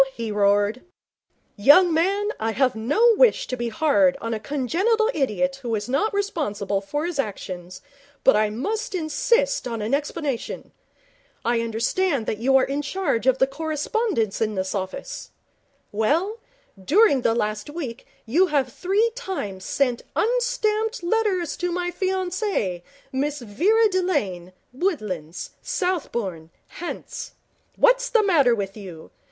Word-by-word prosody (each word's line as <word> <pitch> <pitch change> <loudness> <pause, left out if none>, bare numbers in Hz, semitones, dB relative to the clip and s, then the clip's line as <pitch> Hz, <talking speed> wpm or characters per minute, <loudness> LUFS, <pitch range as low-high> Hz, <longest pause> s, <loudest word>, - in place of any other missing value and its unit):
he 230 -2 -4
roared. 205 +3 +2 0.7
'Young 310 - +6
man, 395 +6 +1
I 225 0 -1
have 255 +2 +2
no 295 - +3
wish - - +4
to 255 - -3
be 240 -1 -3
hard 280 +2 +3
on 230 -3 -3
a 220 - -2
congenital 365 - +1
idiot 270 0 0
who 235 -3 -2
is 205 +1 -3
not 275 - +1
responsible 240 - -2
for 290 +10 -3
his 345 -4 -4
actions, 185 -6 -5 0.4
but 270 - +6
I 215 0 +2
must 415 - -3
insist 465 - +1
on 230 -2 -4
an 215 +4 -2
explanation. 290 -3 -3 0.7
I 235 0 +2
understand 235 +5 0
that 215 - -3
you 265 +3 +4
are 260 - +3
in 280 +2 -1
charge 295 -6 -1
of 260 -1 +4
the 265 - +4
correspondence 310 - -1
in 215 -1 0
this 185 0 -2
office. 190 -2 -5 0.6
Well, 325 - 0 0.4
during 305 - +4
the 230 -1 +2
last 210 +1 -2
week 280 -6 -6 0.2
you 330 +12 +3
have 275 -6 0
three 410 +5 +1
times 335 - -5
sent 250 -4 0
unstamped 450 -2 0
letters 370 -4 0
to 355 0 -2
my 355 0 -2
fiancee, 370 - -1 0.3
Miss 285 +2 -1
Vera 370 - +3
Delane, 290 - -1 0.2
Woodlands, 210 - -3
Southbourne, 235 - -2 0.3
Hants. 475 +8 -6 0.4
What's - - +4
the 455 -3 +3
matter 290 - +4
with 195 -2 -4
you? 180 -7 -10
280 Hz, 140 wpm, -23 LUFS, -, 0.7 s, Young